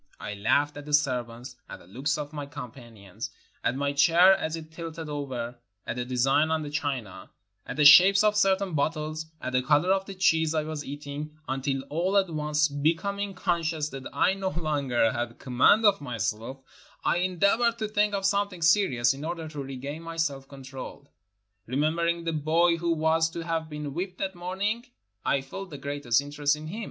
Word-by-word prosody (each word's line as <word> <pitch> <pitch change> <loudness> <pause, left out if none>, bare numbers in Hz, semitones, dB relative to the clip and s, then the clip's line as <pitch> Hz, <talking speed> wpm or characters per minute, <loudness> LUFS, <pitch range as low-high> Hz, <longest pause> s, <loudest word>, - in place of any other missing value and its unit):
I 105 - -5
laughed 140 +9 +1
at 145 - -8
the 150 - +4
servants, 125 -3 -2
at - - -7
the - - -18
looks 135 - -2
of 150 0 -6
my 145 -2 -5
companions, 115 - -9 0.3
at 120 - +1
my 140 +1 -1
chair 170 +6 +6
as 160 -4 -3
it 160 -1 -9
tilted 165 0 -7
over, 130 -5 -5 0.3
at - - -3
the 125 - -2
designs 135 +5 +2
on 160 -1 0
the 145 - -6
china, 130 -11 -4 0.4
at - - -5
the 150 - +2
shapes 190 +7 +9
of 210 0 +3
certain 195 -2 +2
bottles, 155 +1 -2
at 130 - -5
the 125 - +3
color 150 +7 +3
of 195 0 -1
the 195 - -7
cheese 160 -3 +2
I 155 - +1
was 155 -1 -5
eating, 145 +2 -7
until 135 0 -2
all 180 +6 +1
at 190 -3 +2
once, 150 0 +1
becoming 170 +8 -1
conscious 165 -4 -1
that 135 -2 -7
I 190 - +2
no 195 -1 -2
longer 145 -9 0
had 120 0 -4
com 125 -2 -8
mand 215 - +6
of 200 -5 +4
myself, 120 0 -4 0.4
I - - +2
endeavored 200 +6 +2
to 220 -2 -2
think 210 -1 +1
of 195 -1 -2
something 200 -3 0
serious 160 - +3
in 140 +2 -8
order 165 0 -4
to 150 -2 -6
regain 135 +3 -6
my 165 0 -8
self 140 -4 -1
control. 135 -1 -10 0.6
Remembering 165 +6 0
the 165 -1 -2
boy 165 +3 +2
who 170 0 -1
was 160 +1 +2
to 170 - -6
have 165 -1 -2
been 150 -2 -5
whipped 180 +3 -4
that 190 0 -3
morning, 190 +6 -2 0.4
I - - +2
NORTHERN - - +2
AFRICA 135 - -20
felt 195 0 -6
the 145 - -8
greatest 140 -3 0
interest 145 +1 0
in 150 +1 -9
him. 190 +8 -6
155 Hz, 195 wpm, -27 LUFS, 135-175 Hz, 0.6 s, shapes